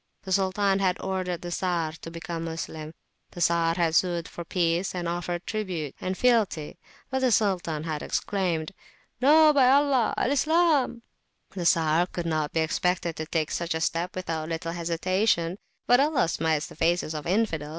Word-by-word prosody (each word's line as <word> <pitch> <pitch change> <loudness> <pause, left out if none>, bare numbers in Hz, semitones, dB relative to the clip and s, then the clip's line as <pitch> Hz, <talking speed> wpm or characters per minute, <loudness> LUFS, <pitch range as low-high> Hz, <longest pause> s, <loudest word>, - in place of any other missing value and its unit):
The 190 - -7
Sultan 195 +1 +2
had 185 -2 +1
ordered 185 -2 -3
the 175 - -5
Czar 175 -3 -1
to - - -7
become 165 0 -5
a - - -3
Moslem. 160 -1 -6 0.4
The - - -11
Czar 170 -1 +2
had 170 -2 +1
sued 170 -1 +1
for 170 - -8
peace, 175 +1 0
and 175 -1 -3
offered 175 +1 -3
tribute 180 -10 -3
and 185 0 -3
fealty. 220 -11 +1 0.3
But 265 - 0
the 260 -2 +2
Sultan 180 -8 +1
had 155 -2 -3
exclaimed 180 -4 -1 0.5
"No, 305 +3 +6
by 265 -3 +5
Allah! 275 -3 +3
Al 255 - +1
Islam!" 300 -5 +2 0.5
[p.292] - - -23
The 180 -3 -3
Czar 165 +1 +3
could 175 -2 -5
not 155 -3 -1
be 160 - 0
expected 170 +1 0
to 155 - -4
take 155 -2 -1
such 170 -1 -2
a - - -1
step 170 +2 -1
without 165 -4 -3
a - - -8
little 165 0 -3
hesitation, 175 +2 0 0.3
but 245 +1 +5
"Allah 290 - +2
smites 160 -2 0
the - - -12
faces 165 0 0
of 150 -2 -5
the - - -3
Infidels!" 180 -7 0
175 Hz, 185 wpm, -26 LUFS, 165-200 Hz, 0.5 s, No